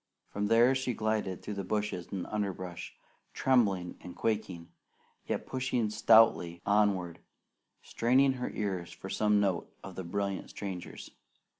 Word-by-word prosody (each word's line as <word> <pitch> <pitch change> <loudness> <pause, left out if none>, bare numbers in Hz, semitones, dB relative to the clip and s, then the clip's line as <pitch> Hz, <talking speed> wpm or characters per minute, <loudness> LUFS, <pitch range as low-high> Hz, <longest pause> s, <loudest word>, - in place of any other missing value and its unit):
From 105 0 -2
there 115 +4 +5
she 130 -2 -1
glided 110 -4 -1
through 105 - -4
the 100 -1 -4
bushes 105 -2 -2
and 95 -3 -3
underbrush, 95 -4 -4 0.4
trembling 100 -9 +2
and 90 - -9
quaking, 105 -7 -2 0.6
yet - - -2
pushing 125 -4 -1
stoutly 110 -6 +5
onward, 100 -5 +2 0.6
straining 130 +3 +3
her - - -1
ears 95 -5 -3
for - - -9
some 105 -1 +3
note 95 -4 0
of - - -8
the 95 - -6
brilliant 100 +2 -3
stranger's. 95 -3 -7
105 Hz, 135 wpm, -31 LUFS, 90-110 Hz, 0.6 s, there